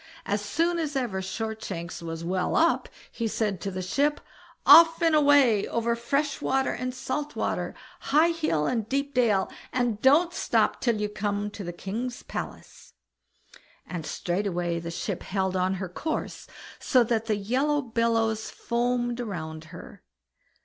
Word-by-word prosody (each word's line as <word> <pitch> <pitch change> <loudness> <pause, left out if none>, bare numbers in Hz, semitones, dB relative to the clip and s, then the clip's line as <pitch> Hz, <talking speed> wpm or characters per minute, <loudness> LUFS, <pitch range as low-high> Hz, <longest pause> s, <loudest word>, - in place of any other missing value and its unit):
As 205 +1 -1
soon 335 +10 0
as 305 -3 -2
ever 235 -8 -1
Shortshanks 190 -4 -5
was 165 0 -5
well 180 +2 -1
up, 335 +1 +2 0.2
he 230 - -2
said 210 -4 -1
to 200 - -2
the 185 -1 -4
ship, 285 +10 +1 0.5
"Off 330 0 +9
and 330 -2 +3
away, 285 -8 +5
over 235 0 0
fresh 280 +5 -1
water 265 0 +1
and 255 0 -3
salt 275 +3 -4
water, - - -2 0.2
high 315 +4 +3
hill 310 - 0
and 225 0 -1
deep 280 +1 -1
dale, 220 -6 +2 0.2
and 240 -4 0
don't 320 +6 +5
stop - - +1
till 235 -4 +1
you 210 - 0
come 205 0 -2
to 205 0 -7
the 175 - -4
king's 225 +8 -5
palace"; - - -8 0.9
and 165 -4 -6
straightway 175 -2 -1
the 170 0 -6
ship 170 - -4
held 190 -1 -1
on 185 +1 +1
her 190 0 -4
course, 310 - -4 0.3
so 255 -3 +4
that 225 -1 -1
the 215 - +2
yellow 265 +9 +1
billows 225 -2 0
foamed 240 0 -1
round 160 -8 -5
her. 170 +2 -12
225 Hz, 155 wpm, -27 LUFS, 190-265 Hz, 0.9 s, Off